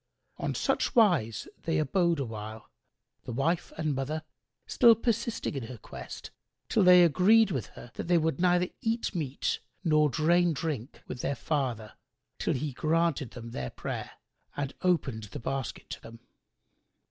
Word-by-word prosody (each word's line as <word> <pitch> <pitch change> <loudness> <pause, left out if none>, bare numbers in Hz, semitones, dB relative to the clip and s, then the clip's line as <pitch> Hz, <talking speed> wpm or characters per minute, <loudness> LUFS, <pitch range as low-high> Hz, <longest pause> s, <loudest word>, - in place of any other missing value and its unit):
On - - -2
such - - 0
wise 175 - +3
they 165 - 0
abode 170 +2 +2
awhile, 110 -3 -6 0.5
the - - -5
wife 160 +8 0
and 155 -2 0
mother 145 +4 -3 0.4
still 235 -2 +6
persisting 230 0 -1
in 135 -5 -4
her 125 - -8
quest - - -9 0.4
till 220 - +3
they 180 -1 +8
agreed 195 +7 +5
with 130 -6 -2
her 120 - -10
that - - -5
they 175 -1 +4
would 160 -3 0
neither 180 0 +3
eat 225 0 -1
meat 145 -7 -2 0.2
nor 155 -3 +4
drain 170 +4 +3
drink 140 -4 -4
with 125 - -5
their 140 - -1
father, 125 -9 -2 0.5
till - - 0
he 140 +1 -3
granted 160 -2 +1
them 115 0 -9
their 65 - -4
prayer - - -5 0.4
and 140 -2 -2
opened 135 -12 0
the 100 - -8
basket 135 +1 -4
to - - -6
them. 115 0 -12
155 Hz, 155 wpm, -29 LUFS, 125-175 Hz, 0.5 s, they